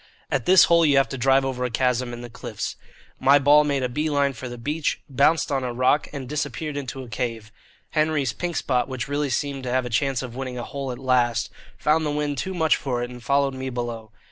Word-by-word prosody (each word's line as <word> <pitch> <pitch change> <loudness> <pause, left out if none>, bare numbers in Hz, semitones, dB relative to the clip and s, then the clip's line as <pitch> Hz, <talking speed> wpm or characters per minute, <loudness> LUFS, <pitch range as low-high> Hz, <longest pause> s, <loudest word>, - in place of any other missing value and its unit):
At 130 -4 -1
this 185 -1 +8
hole 170 0 +5
you 145 -3 +4
have 135 - +3
to - - -4
drive 135 +2 +4
over 130 -1 -2
a 125 - 0
chasm 125 0 0
in 120 0 -7
the 120 - -8
cliffs. - - -5 0.4
My 140 +2 +6
ball 145 +2 +6
made 140 -3 0
a - - +1
bee 150 +5 -2
line 140 -2 +1
for 130 +1 -7
the 120 - -7
beach, 150 +6 -2
bounced 145 +4 +2
on 135 -2 0
a 125 - -2
rock, 130 +4 +2
and 140 -3 -6
disappeared 150 +1 -3
into 135 -1 -5
a - - -10
cave. 115 -1 -4 0.4
Henry's 155 -5 +1
"Pink 175 -2 -4
Spot," 125 -3 0
which 130 -3 -4
really 145 0 -1
seemed 140 +2 -2
to 130 - -5
have 130 0 +1
a 125 - -5
chance 135 +3 0
of 120 -2 -7
winning 130 -1 -5
a 120 - -4
hole 140 0 -5
at 125 - -6
last, 120 -3 +1 0.3
found 155 +1 +2
the 150 - -1
wind 145 -1 -2
too 190 0 -3
much 160 -2 +3
for 125 -3 -2
it 120 - -5
and 125 0 -10
followed 140 +2 +1
me 130 0 -4
below. 120 -3 -5
135 Hz, 245 wpm, -24 LUFS, 125-145 Hz, 0.4 s, this